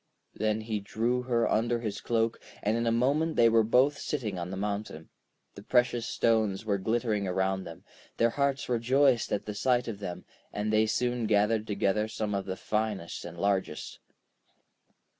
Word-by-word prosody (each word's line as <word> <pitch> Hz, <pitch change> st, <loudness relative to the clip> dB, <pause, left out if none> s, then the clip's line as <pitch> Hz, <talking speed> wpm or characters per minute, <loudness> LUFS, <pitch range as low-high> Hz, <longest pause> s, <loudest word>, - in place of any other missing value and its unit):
Then 110 Hz, 0 st, 0 dB
he 110 Hz, -1 st, -2 dB
drew 115 Hz, +5 st, -1 dB
her 120 Hz, -2 st, +1 dB
under 120 Hz, +2 st, +1 dB
his 105 Hz, -4 st, -4 dB
cloak, 115 Hz, -1 st, 0 dB, 0.2 s
and 105 Hz, +2 st, +1 dB
in 115 Hz, 0 st, 0 dB
a -, -, +3 dB
moment 140 Hz, +7 st, +1 dB
they 115 Hz, -, +6 dB
were 115 Hz, 0 st, +5 dB
both 130 Hz, +6 st, +3 dB
sitting 110 Hz, -11 st, -3 dB
on 85 Hz, +1 st, -4 dB
the 95 Hz, -, -5 dB
mountain. 100 Hz, -5 st, -4 dB, 0.4 s
The 100 Hz, -, -11 dB
precious 120 Hz, +1 st, +1 dB
stones 110 Hz, -3 st, +1 dB
were 100 Hz, -2 st, 0 dB
glittering 110 Hz, -1 st, 0 dB
around 95 Hz, +1 st, 0 dB
them; 85 Hz, -, -10 dB, 0.3 s
their 115 Hz, 0 st, +3 dB
hearts 140 Hz, -1 st, 0 dB
rejoiced 125 Hz, +1 st, +2 dB
at -, -, -1 dB
the 105 Hz, -, -4 dB
sight 125 Hz, +3 st, +1 dB
of 110 Hz, -4 st, -5 dB
them, 90 Hz, -3 st, -6 dB, 0.3 s
and 105 Hz, +1 st, -2 dB
they 110 Hz, 0 st, +4 dB
soon 120 Hz, 0 st, 0 dB
gathered 105 Hz, +1 st, +2 dB
together 105 Hz, +1 st, 0 dB
some 110 Hz, -1 st, -3 dB
of 100 Hz, -1 st, -2 dB
the 95 Hz, -1 st, -4 dB
finest 105 Hz, -5 st, -2 dB
and 85 Hz, 0 st, -8 dB
largest. 95 Hz, -4 st, -1 dB
110 Hz, 175 wpm, -29 LUFS, 100-120 Hz, 0.4 s, they